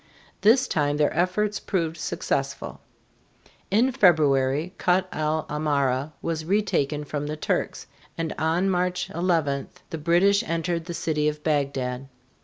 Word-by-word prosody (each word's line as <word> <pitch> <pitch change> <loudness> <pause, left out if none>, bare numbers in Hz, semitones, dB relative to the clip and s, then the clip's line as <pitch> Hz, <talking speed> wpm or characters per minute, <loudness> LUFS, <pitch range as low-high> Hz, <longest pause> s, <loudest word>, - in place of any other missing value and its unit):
This 240 +6 +5
time 145 -1 0
their 150 0 +1
efforts 200 +5 +1
proved 165 -5 -1
successful. - - -3 0.9
In 230 +7 +3
February, 155 - +3
Kut 185 +1 +2
el 155 0 -1
Amara 145 -1 0
was 160 -1 -2
retaken 155 -6 0
from 145 0 -4
the 155 +1 -4
Turks, - - -2 0.3
and 165 -1 -2
on 165 +4 +1
March 180 -1 0
11 160 -5 0 0.2
the 160 - -4
British 175 +6 +3
entered 165 0 -2
the 170 -1 -5
city 150 -2 0
of 150 0 -3
Bagdad. 135 -4 -1
160 Hz, 130 wpm, -25 LUFS, 150-180 Hz, 0.9 s, This